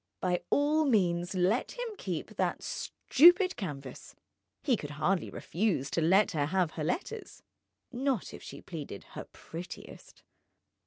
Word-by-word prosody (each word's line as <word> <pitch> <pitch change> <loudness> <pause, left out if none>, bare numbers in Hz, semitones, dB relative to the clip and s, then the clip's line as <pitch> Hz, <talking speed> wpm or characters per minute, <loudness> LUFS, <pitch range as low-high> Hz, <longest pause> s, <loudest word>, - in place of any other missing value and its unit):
By 180 -1 0
all 300 +2 +3
means, 180 -7 +2
let 185 +7 +1
him - - -4
keep - - -5
that - - 0
stupid 355 +6 +4
canvas; 140 - -7 0.5
he 260 - +3
could 145 -9 -6
hardly 175 +5 +1
refuse 175 -7 -1
to 170 - +1
let 190 +6 +4
her 145 -3 0
have 180 -1 +1
her 155 - -4
letters, 395 - -4 0.5
not 260 -3 -1
if - - -9
she - - -9
pleaded 150 - -7
her - - -6
prettiest. 175 +2 -10
185 Hz, 140 wpm, -31 LUFS, 165-265 Hz, 0.5 s, stupid